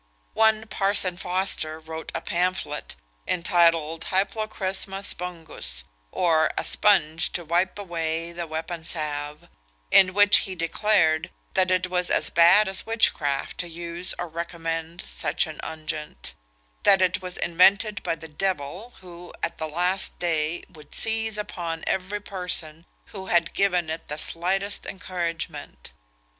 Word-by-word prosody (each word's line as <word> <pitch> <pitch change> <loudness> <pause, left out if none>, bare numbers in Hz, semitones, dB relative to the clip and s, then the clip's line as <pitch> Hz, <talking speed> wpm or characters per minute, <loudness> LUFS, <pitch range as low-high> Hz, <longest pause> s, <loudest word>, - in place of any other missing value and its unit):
One 220 0 +3
"Parson 195 -3 +2
Foster" 180 -3 -1
wrote 160 0 -8
a - - -2
pamphlet, 175 -5 -2 0.3
entitled 165 -2 +2
Hyplocrisma 195 -1 0
Spongus; 170 - -2 0.3
or, 160 -3 +3
a - - 0
Spunge 165 -6 +4
to 175 - -4
wipe 175 +5 0
away 165 -3 -3
the 170 0 -5
Weapon 160 +1 -5
Salve; 150 -3 -4 0.4
in 185 -1 +6
which 205 0 +7
he 190 - -2
declared, 165 -1 +1 0.2
that 185 -1 +2
it 185 0 +2
was 180 -1 -1
as - - +1
bad 175 +5 +6
as 190 0 0
witchcraft 145 -11 0
to 175 - -2
use 170 +2 -1
or 175 - -4
recommend 165 0 -5
such - - 0
an 155 -2 -9
unguent; 155 - -6 0.5
that 195 -1 +5
it 185 +1 +1
was 180 0 -5
invented 195 +5 +3
by - - -1
the 160 0 -11
Devil, 185 +6 -3
who, 175 -1 -12
at - - -3
the 160 - -2
last 180 +4 -1
day, 165 -1 -1
would 150 -3 -12
seize 220 -1 0
upon 170 -6 -5
every 190 +2 -2
person 180 -5 -4 0.3
who 190 -2 -7
had 170 -1 +2
given 180 -4 +1
it 160 - -6
the 150 - -5
slightest 190 +6 -1
encouragement. 170 - -5
175 Hz, 135 wpm, -25 LUFS, 160-190 Hz, 0.5 s, which